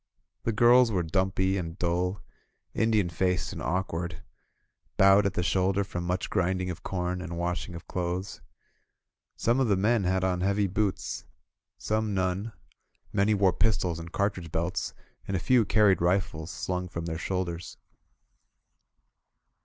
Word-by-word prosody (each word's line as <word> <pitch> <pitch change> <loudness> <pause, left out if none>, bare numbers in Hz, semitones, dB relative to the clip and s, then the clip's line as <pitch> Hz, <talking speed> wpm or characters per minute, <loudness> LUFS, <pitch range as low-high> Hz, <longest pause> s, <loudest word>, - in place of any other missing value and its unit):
The 115 - +2
girls 120 +2 +5
were 90 -4 +1
dumpy 95 +2 +1
and 85 -2 -5
dull, 90 +2 -1 0.5
Indian 110 -4 +2
faced 90 +2 -1
and - - -6
awkward, 85 -1 -2 0.7
bowed 100 +1 +6
at 95 - -4
the 90 - 0
shoulder 95 +2 +2
from 90 -3 -5
much 90 +1 -1
grind 95 -1 +1
ing 90 0 -2
of 85 - -8
corn 90 -1 -2
and 85 -1 -5
washing 85 0 -3
of 85 - -10
clothes. 90 +2 -3 0.9
Some 120 +3 +1
of 130 - +2
the 100 -3 +3
men 105 +1 +2
had 95 +1 +1
on 90 -1 0
heavy 100 +2 +2
boots, 100 +1 -2 0.5
some 110 -1 -1
none; 95 +4 -1 0.6
many 105 +2 +3
wore 95 -2 +3
pis 110 -4 +2
tols 85 -3 -2
and 85 0 -8
cartridge 95 -5 -1
belts, 85 +2 -2 0.3
and 95 - 0
a - - -1
few 120 +4 +3
carried 105 -4 +4
rifles 85 -3 0
slung 90 0 -3
from 85 -1 -5
their 80 -1 -3
shoulders. 90 -3 -3
95 Hz, 155 wpm, -28 LUFS, 90-100 Hz, 0.9 s, bowed